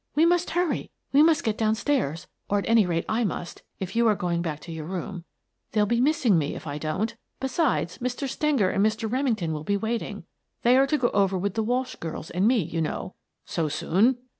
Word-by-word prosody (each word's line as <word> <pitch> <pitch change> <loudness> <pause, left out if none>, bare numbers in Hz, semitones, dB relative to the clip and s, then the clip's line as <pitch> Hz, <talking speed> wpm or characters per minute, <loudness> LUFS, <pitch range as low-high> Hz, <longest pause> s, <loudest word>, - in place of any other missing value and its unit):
We 310 +3 +5
must 350 +1 +2
hurry. 350 0 0 0.2
We 285 - +7
must 325 +1 +4
get 220 -1 -1
down 220 -1 +2
stairs, 180 - -1 0.2
or 205 - +2
at 200 - -2
any 225 -4 +5
rate 170 -1 -1
I 225 +2 +1
must, 175 -4 -4 0.2
if 190 +2 -5
you 235 0 +4
are 215 - +4
going 175 -2 -1
back 155 -3 -3
to 170 - -9
your 160 -1 -6
room. 180 -1 -5 0.5
They'll 210 -1 +3
be 235 +3 +1
miss 295 +1 +1
ing 195 -8 +5
me 145 -1 -2
if - - -8
I 145 -1 -4
don't. 185 +10 -2 0.2
Besides, 265 - 0
Mr. 250 +3 -2
Stenger 270 -8 +1
and 195 - +2
Mr. 220 +1 +1
Remington 225 - 0
will 150 -1 -4
be 200 +4 +1
waiting. 225 +3 -3 0.4
They 245 +1 +5
are 270 +1 +5
to 300 - +2
go 240 -4 +2
over 195 -2 +2
with 195 +1 -1
the 225 - 0
Walsh 250 +4 -1
girls 165 -1 -6
and 185 +4 +2
me, 235 -5 +3
you 165 +1 -3
know." 160 +3 -3 0.3
"So 160 -3 -1
soon?" 205 - +2
215 Hz, 225 wpm, -26 LUFS, 175-250 Hz, 0.5 s, We